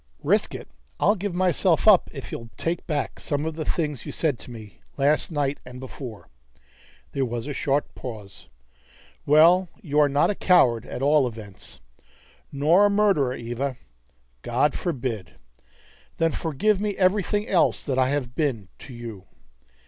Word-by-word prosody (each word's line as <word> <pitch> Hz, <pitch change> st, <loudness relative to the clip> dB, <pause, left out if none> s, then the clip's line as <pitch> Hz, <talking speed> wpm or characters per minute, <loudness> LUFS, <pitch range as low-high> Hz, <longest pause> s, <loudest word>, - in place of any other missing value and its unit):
"Risk -, -, +1 dB
it? -, -, -8 dB, 0.3 s
I'll -, -, +4 dB
give 200 Hz, -3 st, -4 dB
myself 180 Hz, 0 st, +2 dB
up 205 Hz, -4 st, +6 dB
if 135 Hz, -3 st, -8 dB
you'll 115 Hz, -1 st, -7 dB
take 165 Hz, +1 st, -3 dB
back 150 Hz, -3 st, -2 dB
some 145 Hz, +1 st, -2 dB
of 160 Hz, -, -2 dB
the 155 Hz, -1 st, -5 dB
things 150 Hz, -7 st, -2 dB
you -, -, -6 dB
said 150 Hz, -7 st, -1 dB
to -, -, -11 dB
me 110 Hz, -4 st, -11 dB, 0.2 s
last 145 Hz, +4 st, +2 dB
night 145 Hz, -2 st, -1 dB
and 125 Hz, 0 st, -10 dB
before." 125 Hz, -4 st, -9 dB, 0.8 s
There 135 Hz, -, -1 dB
was 120 Hz, -2 st, -3 dB
a 145 Hz, -, -4 dB
short 140 Hz, +1 st, -1 dB
pause. 105 Hz, -6 st, -9 dB, 0.8 s
"Well, 170 Hz, +5 st, +6 dB
you 150 Hz, -3 st, 0 dB
are 145 Hz, -1 st, +5 dB
not 140 Hz, +7 st, +2 dB
a -, -, -1 dB
coward, 125 Hz, -, +3 dB
at 130 Hz, -, -5 dB
all 145 Hz, -2 st, +4 dB
events!" 110 Hz, -5 st, -10 dB, 0.7 s
"Nor 160 Hz, +8 st, +4 dB
a -, -, +1 dB
murderer, 195 Hz, -11 st, +2 dB
Eva!" 120 Hz, +3 st, -4 dB, 0.6 s
"God 130 Hz, -, +1 dB
forbid." 120 Hz, -, -4 dB, 0.8 s
"Then 165 Hz, 0 st, +2 dB
forgive 180 Hz, +8 st, 0 dB
me 210 Hz, -1 st, -1 dB
for -, -, -14 dB
everything 205 Hz, +2 st, +1 dB
else 180 Hz, -4 st, +2 dB
that 130 Hz, -3 st, -1 dB
I 130 Hz, 0 st, +3 dB
have 135 Hz, -4 st, -2 dB
been 125 Hz, -, -2 dB
to 135 Hz, -, -11 dB
you!" 115 Hz, -5 st, -8 dB
145 Hz, 165 wpm, -24 LUFS, 125-170 Hz, 0.8 s, up